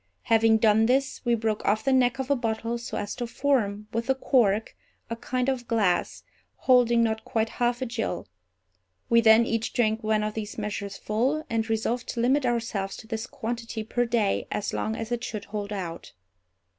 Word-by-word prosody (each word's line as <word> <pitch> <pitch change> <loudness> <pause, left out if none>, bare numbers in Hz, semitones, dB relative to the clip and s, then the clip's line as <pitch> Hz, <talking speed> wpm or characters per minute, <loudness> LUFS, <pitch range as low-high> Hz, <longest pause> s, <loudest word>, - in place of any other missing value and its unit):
Having 225 -1 +4
done 220 0 +4
this, 265 +2 0
we 240 0 +3
broke 220 -2 -1
off 215 +2 +1
the 270 - +2
neck 255 0 +3
of 265 +1 -3
a - - +5
bottle 230 -1 -2
so 235 - -5
as 205 0 -3
to 240 - -4
form, 220 -6 0
with 230 +1 -2
the 265 - +3
cork, 225 -6 +2 0.4
a - - -1
kind 250 +2 -2
of 255 -3 -1
glass, 205 -6 0 0.3
holding 240 -2 +4
not 220 -1 -1
quite 225 0 -1
half 245 +1 0
a - - -1
gill. 230 -6 -3 0.8
We 230 0 +6
then 225 +1 +6
each 230 -1 -2
drank 220 -2 +1
one 215 0 +1
of 215 0 -2
these 215 -1 -5
measures 205 -2 -4
full, 260 +9 -1
and 225 0 0
resolved 225 +2 -1
to 235 - -3
limit 260 +3 +2
ourselves 225 -5 -2
to - - -11
this 225 +1 -4
quantity 230 -3 -4
per 245 +3 0
day 230 -4 0
as 210 - -3
long 220 - -1
as 225 +1 -5
it 240 0 -2
should 210 -3 -5
hold 205 0 -5
out. 180 -5 -6
230 Hz, 195 wpm, -26 LUFS, 215-245 Hz, 0.8 s, We